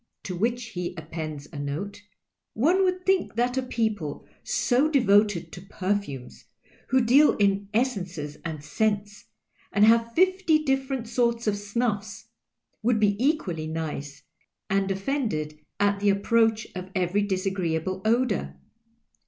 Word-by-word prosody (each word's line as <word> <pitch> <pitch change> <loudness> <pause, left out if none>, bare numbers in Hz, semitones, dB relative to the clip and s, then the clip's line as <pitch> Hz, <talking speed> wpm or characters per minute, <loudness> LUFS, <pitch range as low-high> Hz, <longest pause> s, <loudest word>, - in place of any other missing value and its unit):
"' - - -58
To 185 - -4
which 235 +5 -1
he 180 -5 -4
appends 155 -2 -6
a 145 - -5
note: 160 +9 -4 0.2
— - - -59
" - - -60
One 360 +4 +4
woidd 365 -1 +1
think 380 - +1
that 245 +2 +1
a 260 - +1
people 220 - -2 0.2
so 265 +5 +2
devoted 205 - +3
to 180 - -9
perfumes, 190 -9 -4 0.4
who 260 0 +3
deal 265 +6 +5
in 200 -1 +1
essences 185 - -2
and 155 -3 -5
scents, 205 +5 -1 0.5
and 205 +1 +5
iiave 230 +1 +3
fifty 370 -3 +3
different 270 -3 -1
sorts 235 0 0
of 210 -2 +1
snuffs, 210 0 -3 0.5
would 225 0 +2
be 205 -1 +3
eciualiy 210 - 0
nice, 150 -3 -5 0.5
and 195 0 +1
offended 195 - -2 0.2
at 205 0 +2
the 205 0 +2
approach 225 +2 +2
of 185 0 -6
every 185 +2 +1
disagreeable 185 -2 -1
odour. 230 0 +1
205 Hz, 140 wpm, -26 LUFS, 185-240 Hz, 0.5 s, deal